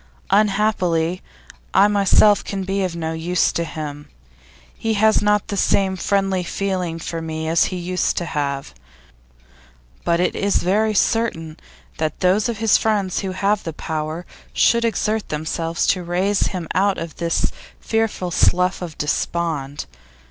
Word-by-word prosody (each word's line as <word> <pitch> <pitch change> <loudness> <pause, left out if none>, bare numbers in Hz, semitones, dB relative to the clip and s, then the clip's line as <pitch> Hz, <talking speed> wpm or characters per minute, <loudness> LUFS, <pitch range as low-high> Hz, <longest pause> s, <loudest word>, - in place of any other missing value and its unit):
'Unhappily, 195 -4 +2 0.5
I 195 +2 +7
myself 205 0 +4
can 195 -1 -4
be 195 +1 -1
of 180 -2 -2
no 160 -1 -3
use 170 +2 +1
to 170 - -1
him; 150 -2 -7 0.7
he 225 -1 -1
has 220 +1 +4
not 210 -1 +1
the 200 - -2
same 190 -1 +2
friendly 195 0 0
feeling 180 -2 -2
for 165 0 -5
me 160 0 -4
as 165 +1 +3
he 185 - -3
used 180 +1 -1
to 175 - -1
have. 140 -4 -3 1.3
But 170 0 +1
it 180 - +1
is 200 0 0
very 210 +4 +1
certain 180 -9 0 0.4
that 155 -1 -2
those 195 +5 +3
of 230 - -3
his 225 -1 +3
friends 205 -4 0
who 190 -2 -3
have 200 +2 +1
the 165 - -5
power 155 +3 -4 0.3
should 235 0 +3
exert 220 0 -1
themselves 165 +2 -2
to 185 - +2
raise 185 +4 +1
him 180 -4 -4
out 195 +2 +2
of 165 -2 -6
this 170 -1 0 0.3
fearful 225 -5 -1
slough 180 +3 +2
of 170 -4 -6
despond. 150 -2 -2
180 Hz, 150 wpm, -21 LUFS, 165-200 Hz, 1.3 s, I